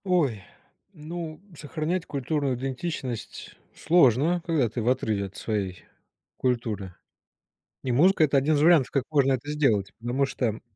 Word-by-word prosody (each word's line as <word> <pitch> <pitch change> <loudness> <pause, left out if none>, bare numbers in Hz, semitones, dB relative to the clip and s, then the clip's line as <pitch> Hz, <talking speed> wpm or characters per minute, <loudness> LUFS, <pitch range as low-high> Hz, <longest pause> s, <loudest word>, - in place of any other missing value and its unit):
Ой, 150 - +1 0.5
ну, 160 -1 -7 0.2
сохранять 160 +4 -3
культурную 140 -1 -1
идентичность 130 -1 -5 0.2
сложно, 160 +1 +3
когда 155 -8 +2
ты 115 +2 -4
в 115 - +1
отрыве 110 -6 0
от 95 - -11
своей 100 -5 -3 0.5
культуры. 110 -7 -2 0.9
И 130 - -1
музыка 165 +7 +4
это 145 -2 +3
1 140 +3 +2
из 145 - +1
вариантов, 160 -4 +5
как 140 -4 +1
можно 135 -3 +3
это 130 +3 -4
сделать. 110 -10 +1
Потому 120 +4 0
что 120 -5 -2
135 Hz, 140 wpm, -26 LUFS, 120-155 Hz, 0.9 s, вариантов